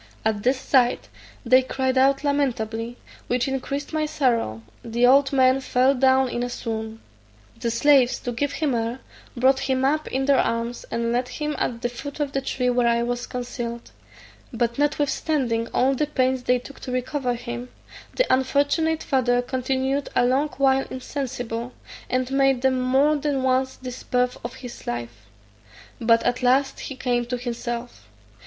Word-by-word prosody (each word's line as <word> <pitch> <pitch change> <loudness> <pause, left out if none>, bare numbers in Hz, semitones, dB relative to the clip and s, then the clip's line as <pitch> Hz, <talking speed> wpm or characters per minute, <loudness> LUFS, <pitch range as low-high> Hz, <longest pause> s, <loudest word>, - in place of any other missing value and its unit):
At 215 -2 +1
this 255 +4 +1
sight 255 -2 +2 0.4
they 255 +2 +6
cried 260 0 -1
out 275 +2 +3
lamentably, 240 -5 -1 0.3
which 245 +1 0
increased 275 +2 -3
my 310 -1 0
sorrow: 230 - 0 0.2
the 235 +1 +1
old 270 +2 +5
man 260 -1 +4
fell 260 0 +2
down 265 0 +3
in 240 -1 -3
a 245 - -2
swoon. 220 -2 -5 0.6
The 235 -1 -1
slaves, 255 +1 +4
to 245 - -3
give 280 +4 -2
him 300 -4 0
air, 235 +2 -2 0.4
brought 265 +2 +4
him 260 0 +2
up 305 +3 +1
in 265 +1 -1
their 280 -1 +4
arms, 230 +1 -1
and 235 0 -1
laid 245 +1 0
him 300 +2 -3
at 235 -1 -2
the - - +2
foot 280 +4 -8
of 290 -2 -1
the 275 - -1
tree 250 -1 0
where 245 -1 +2
I 235 0 +2
was 245 0 -3
concealed; 240 -1 -5 0.6
but 235 +1 -1
notwithstanding 290 -5 0
all 265 +2 +2
the 295 +3 0
pains 260 -3 +1
they 250 - +3
took 260 +3 -11
to 255 - -6
recover 255 0 -1
him, 240 +1 -6 0.5
the - - +3
unfortunate 285 +5 +1
father 245 -3 +2
continued 265 +2 -1
a 245 - +4
long 265 +4 +2
while 270 -1 +3
insensible, 250 -3 -4 0.4
and 255 0 -1
made 270 -2 +2
them 260 -1 +2
more 270 +4 +3
than 285 -2 -1
once 260 0 +1
despair 250 0 -1
of 235 - -6
his 245 -2 -10
life; 120 -3 -5 0.7
but 230 0 +3
at 245 - 0
last 265 +2 +2
he 270 - -6
came 245 -2 0
to 250 0 -2
himself. 240 0 -5
255 Hz, 165 wpm, -24 LUFS, 240-270 Hz, 0.7 s, they